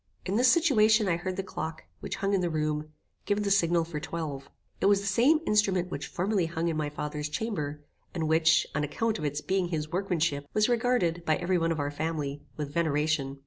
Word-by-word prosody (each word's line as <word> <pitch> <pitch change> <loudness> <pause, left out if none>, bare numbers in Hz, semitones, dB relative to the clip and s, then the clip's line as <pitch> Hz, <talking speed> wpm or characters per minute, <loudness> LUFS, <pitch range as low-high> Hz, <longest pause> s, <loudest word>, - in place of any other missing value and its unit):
In 195 - -1
this 250 +3 +5
situation 220 - +4
I 175 - +2
heard 185 +2 -4
the 195 - -3
clock, 160 -3 -5 0.2
which - - -4
hung 195 +1 -1
in 195 - +2
the 175 - 0
room, 155 -1 -1 0.4
give 205 +1 +1
the 200 - 0
signal 170 -3 +3
for 160 -2 -5
twelve. 150 -3 -5 0.3
It - - +2
was 200 0 +5
the - - -6
same 250 +11 +4
instrument 190 -4 +2
which 140 - -4
formerly 185 -1 0
hung 165 +1 -1
in 165 - -1
my 155 -1 -1
father's 150 0 -4
chamber, 150 -5 -3 0.3
and 160 -3 -2
which, 160 0 +4
on 150 - 0
account 220 +9 -1
of 150 - -3
its 145 +1 -2
being 190 +1 0
his 155 -2 -3
workmanship, 170 -6 -1
was 215 0 +4
regarded, 235 -9 +1
by 155 -2 +2
every 180 +1 0
one 165 0 +1
of 160 - -1
our 145 0 -1
family, 145 -2 -3 0.2
with 145 -2 -4
veneration. 150 -3 0
170 Hz, 215 wpm, -28 LUFS, 150-195 Hz, 0.4 s, this